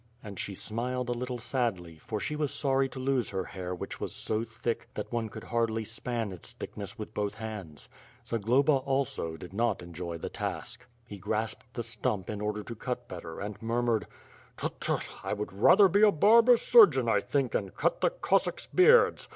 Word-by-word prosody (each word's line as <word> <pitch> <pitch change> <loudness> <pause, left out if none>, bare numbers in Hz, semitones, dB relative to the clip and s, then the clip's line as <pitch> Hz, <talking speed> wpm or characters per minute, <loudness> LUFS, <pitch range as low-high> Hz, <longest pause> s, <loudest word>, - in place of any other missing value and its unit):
And 100 -4 -8
she 100 - -4
smiled 125 +5 -2
a - - +1
little 125 +1 -4
sadly, 100 - -2
for 110 +5 -4
she 150 - -2
was 150 -2 -1
sorry 135 -1 +1
to 130 - -10
lose 130 -3 0
her 95 -1 -2
hair 90 -1 -5
which - - -6
was - - -3
so 110 +1 -1
thick 115 +1 -4
that - - -5
one 115 -2 -1
could 110 +1 -9
hardly 115 -1 -1
span 115 -1 -3
its 90 -3 -4
thick - - -8
ness 105 +3 -6
with 110 -1 -7
both 105 -1 -2
hands. 100 - -7 0.4
Zagloba, 120 +7 +2
also, 135 -11 -2
did 90 +3 -10
not 110 -3 0
enjoy 85 0 -6
the - - -5
task. 125 +1 -5 0.2
He 100 -4 -9
grasped 110 +4 -3
the 120 - -2
stump 110 -4 -2
in 105 -1 -5
order 105 0 -2
to 120 - -7
cut 125 +2 -4
better, 85 -5 -8
and 105 0 -6
mur 115 +2 0
mured: 115 -3 +1 0.5
"Tut! - - -4
Tut! - - -1 0.2
I - - -2
would 105 -1 -4
rather 190 - +6
be 200 +3 +2
a 215 -1 +7
barber 230 +8 +6
surgeon 450 - +6
I - - +4
think, - - -1
and - - -2
cut - - 0
the - - +4
Cossacks - - 0
beards. 455 +5 +5
115 Hz, 200 wpm, -29 LUFS, 105-130 Hz, 0.5 s, a